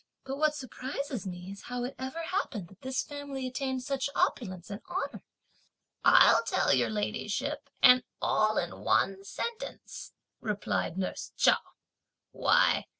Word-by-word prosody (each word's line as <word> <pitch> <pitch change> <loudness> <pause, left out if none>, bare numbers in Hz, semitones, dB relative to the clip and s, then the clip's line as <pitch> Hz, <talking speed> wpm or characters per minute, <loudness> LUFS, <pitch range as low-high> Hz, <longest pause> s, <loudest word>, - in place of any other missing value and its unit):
but 270 0 -4
what 305 0 +2
surprises 265 - -5
me 180 +1 -6
is 200 - -9
how 245 0 -3
it 250 - -3
ever 265 +6 -4
happened 235 - -2
that 195 +2 -19
this 260 0 -1
family 285 -2 -6
attained 260 0 -2
such 275 +1 -1
opulence 185 -6 -1
and 200 - -6
honour!" - - -3 0.8
"I'll - - +7
tell 370 - +2
your 125 -3 +3
ladyship 210 - -2
and 250 -1 +8 0.2
all 215 0 +2
in 175 - -2
one 195 0 +2
sentence," 470 - -6 0.3
replied 205 -4 -2
nurse 190 - -3
Chao. - - +6
250 Hz, 135 wpm, -30 LUFS, 195-275 Hz, 0.8 s, and